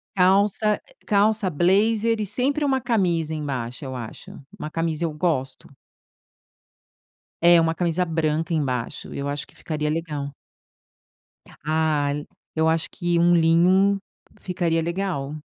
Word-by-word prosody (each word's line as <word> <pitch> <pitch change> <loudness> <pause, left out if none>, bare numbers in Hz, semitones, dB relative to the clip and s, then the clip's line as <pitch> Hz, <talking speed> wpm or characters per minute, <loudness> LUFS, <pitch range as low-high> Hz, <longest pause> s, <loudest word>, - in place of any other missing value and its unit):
Calça 200 +3 +3 0.3
calça 205 -1 +2
blazer 215 +7 +2
e 210 - -1
sempre 270 +8 0
uma 265 -2 +1
camisa 175 -9 0
embaixo 135 -4 -4
eu 130 -1 -5
acho. 115 -3 -8 0.3
Uma 155 - -5
camisa 165 0 -2
eu 155 - -3
gosto. 150 -5 -2 1.7
É, 170 0 +7
uma 165 0 +1
camisa 175 +1 0
branca 160 -1 -1
embaixo. 130 -6 -2
Eu 140 0 -3
acho 145 0 -4
que - - -22
ficaria 150 -1 -3
legal. 150 -3 -3 1.3
Ah, 155 -2 +1 0.4
eu 160 0 +2
acho 160 0 0
que 175 -1 -1
um 175 +1 +5
linho 180 +4 +4 0.4
ficaria 175 -3 0
legal. 170 -5 -3
165 Hz, 125 wpm, -23 LUFS, 150-190 Hz, 1.7 s, É